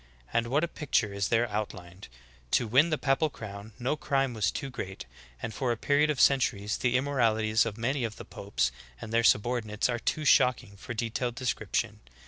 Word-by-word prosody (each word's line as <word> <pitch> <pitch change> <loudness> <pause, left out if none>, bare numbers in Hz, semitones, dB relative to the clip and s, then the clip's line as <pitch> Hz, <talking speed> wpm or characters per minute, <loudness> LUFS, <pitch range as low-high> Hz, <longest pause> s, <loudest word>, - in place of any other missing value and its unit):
^ - - -28 0.3
And 115 0 +1
what 145 +6 +1
a - - +1
picture 130 -10 -1
is 100 -1 -1
there 120 +1 +2
outlined! 95 -3 -5 0.5
To 120 - -1
win 135 +9 +4
the 155 - +1
papal 145 +3 +1
crown 105 -3 -9
no 125 +4 -1
crime 135 -3 0
was 105 -3 +1
too 135 +5 -5
great, 95 -6 -6 0.4
and 110 - -3
for 125 +2 -1
a 120 - -1
period 145 +5 +2
of 150 - -1
centuries 110 -6 +3
the 125 0 +2
immoralities 115 -5 +2
of 110 -1 -5
many 130 +3 -1
of 110 -2 -3
the - - -10
popes - - -2 0.3
and 110 - -8
their 115 0 +3
subordinates 110 0 +2
are 120 -1 -1
too 155 +5 -2
shocking 125 -6 +3
for 110 +4 -7
detailed 120 +1 -2
descrip 125 0 -3
tion. - - 0
120 Hz, 200 wpm, -29 LUFS, 110-135 Hz, 0.5 s, win